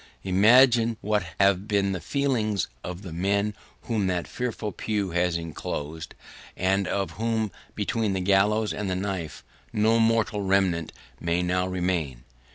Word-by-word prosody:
Imagine 115 +4 +5
what 105 0 +1 0.2
have 100 0 +3
been 100 -2 +1
the 95 -2 -3
feelings 120 -8 0 0.2
of 90 +2 -6
the 90 -4 -7
men 100 +4 0 0.3
whom 110 -5 0
that 90 -2 -1
fearful 115 -4 -3
pew 100 -1 -2
has 85 0 +1
enclosed, 80 -1 -5 0.4
and 95 +1 +1
of 100 -1 -1
whom, 110 -2 -1 0.2
between 105 0 0
the 95 - -1
gallows 100 +3 +2
and 105 -2 -3
the 95 - 0
knife, 95 -4 -4 0.3
no 110 +2 +3
mortal 115 -2 +2
remnant 95 -4 +1 0.3
may 85 +1 0
now 90 +1 0
remain! 90 -9 -2
100 Hz, 145 wpm, -26 LUFS, 90-110 Hz, 0.4 s, Imagine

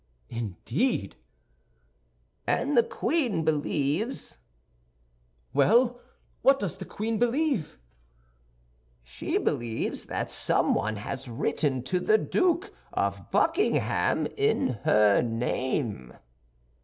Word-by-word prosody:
"Indeed!" 115 - -2 1.3
"And 285 +2 +1
the 235 - +7
queen 230 - -1
believes—" 155 - -1 1.1
"Well, 240 - +4 0.4
what 270 0 +5
does 195 - -4
the 190 - -6
queen 220 +1 -3
believe?" 245 - 0 1.3
"She - - -3
believes 115 -1 -2
that - - -3
someone 110 0 +1
has 130 +6 -6
written 130 +2 -1
to 180 +7 0
the 430 - +4
Duke 375 0 +1 0.2
of - - -2
Buckingham 335 +6 +2
in 425 - +2 0.2
her 105 -1 +5
name." 115 - -2
170 Hz, 90 wpm, -27 LUFS, -, 1.3 s, the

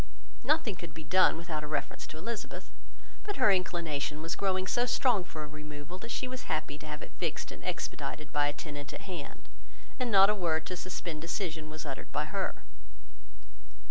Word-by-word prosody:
Nothing 305 -9 +3
could 170 -4 -8
be 160 - -6
done 185 +3 +6
without 165 -2 -3
a - - -3
reference 150 - -1
to 155 - -8
Elizabeth: 215 +6 -4 0.5
but 410 - -2
her 235 -6 +6
inclination 165 -5 +1
was 165 - -1
growing 190 -1 +2
so 240 +6 +3
strong 235 -5 +4
for 155 -3 -6
a - - -5
removal, 150 +3 -7
that 230 - -7
she 245 - -1
was 255 0 -6
happy 155 -2 0
to 155 - -8
have 150 0 -4
it - - -8
fixed 165 -3 -1
and - - -9
expedited 155 -4 -3
by 145 0 +4
a 145 - 0
tenant 145 -1 -6
at - - -6
hand; 180 - -6 0.5
and 250 -1 +1
not 195 -1 +8
a - - +3
word 165 -6 +1
to 180 - -2
suspend 175 -3 -3
decision 165 -2 -2
was 155 0 -6
uttered 135 -2 -5
by - - +1
her. - - -2
165 Hz, 195 wpm, -32 LUFS, 150-190 Hz, 0.5 s, not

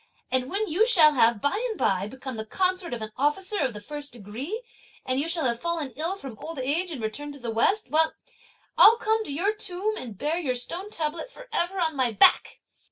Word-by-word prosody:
And 260 0 0
when 420 +3 0
you 380 +8 +3
shall 325 -10 +6
have 230 -5 +3
by 400 +11 0
and 440 - -5
by 195 0 +1
become 260 +2 -7
the 220 - -4
consort 365 - -1
of 235 -2 -4
an 215 - -6
officer 370 +9 0
of 260 -7 0
the - - -6
first 290 +5 -7
degree, 245 - -6 0.4
and 260 +1 0
you 295 - 0
shall 330 -3 0
have 235 -2 0
fallen 330 -5 -2
ill 325 +7 -2
from 270 - -10
old 330 -1 -7
age 295 +8 0
and 275 -9 -6
returned 290 +7 -4
to 285 - -12
the 235 -2 -4
west, 390 - +1 0.9
I'll 455 +2 +9
come 445 -1 0
to - - -6
your 365 +9 +1
tomb 420 +1 -3
and 225 -6 -7
bear 310 - -1
your 265 -7 -1
stone 345 +11 -4
tablet 325 +2 -3
for - - -13
ever 380 -1 +1
on 320 -3 0
my 255 -3 +2
back!" 210 - +4
300 Hz, 220 wpm, -26 LUFS, 250-370 Hz, 0.9 s, I'll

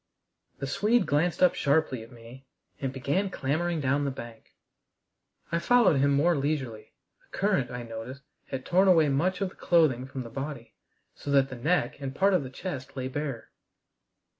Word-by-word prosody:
The - - -4
Swede 215 - +2
glanced 165 +5 +1
up 180 - +6
sharply 140 -4 +1
at 115 - -12
me, 120 +3 -14 0.3
and 135 -2 -2
began 145 +9 -1
clambering 165 +2 -1
down 140 +1 +1
the 140 - 0
bank. 120 -4 -10 1.0
I 170 - +1
followed 220 - +4
him 140 +1 +3
more 150 +5 +3
leisurely. 135 -6 -3 0.3
The - - -12
current, 195 -11 +1
I 125 -1 -5
noticed, 115 +4 -8 0.2
had 130 -1 -5
torn 185 +2 +3
away 165 -5 +5
much 180 +8 0
of 195 - 0
the - - -18
clothing 145 -7 +2
from 130 -1 -6
the 115 - -10
body, 135 -4 -6 0.4
so - - -9
that 135 -1 +4
the 130 - -6
neck 150 +8 0
and 135 -1 -5
part 195 +1 +3
of 185 - +3
the 130 - -6
chest 135 -2 -7
lay 130 0 -3
bare. 135 -4 -5
140 Hz, 180 wpm, -28 LUFS, 130-170 Hz, 1.0 s, up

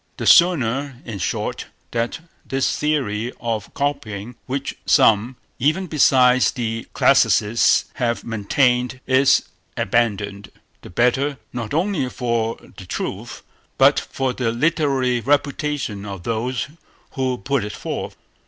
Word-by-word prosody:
The - - -4
sooner, 140 -6 +4
in 110 -5 -6
short, 85 - -3 0.2
that 120 +6 -2 0.2
this 135 0 -1
theory 125 -7 -1
of 115 -3 -3
copying, 120 -6 -3
which 135 +2 -3
some, 120 -2 +4 0.2
even 155 +9 +1
besides 130 -5 +4
the 115 -3 -4
classicists, 110 +3 +4
have 120 -3 -1
maintained, 125 +3 +1
is 130 +1 +4 0.3
abandoned, 100 -3 -1 0.3
the - - -11
better, 130 +8 +1 0.2
not 120 +1 -4
only 165 -6 0
for 115 -2 -1 0.2
the 95 - -10
truth, - - -5 0.3
but - - +5
for 130 -1 -3
the 120 -3 -1
literary 135 -2 +1
reputation 140 -4 -1
of 100 -3 -7
those 120 +3 -2 0.4
who 130 -3 -1
put 140 -2 -1
it 105 - -5
forth. - - -5
125 Hz, 120 wpm, -21 LUFS, 115-140 Hz, 0.4 s, but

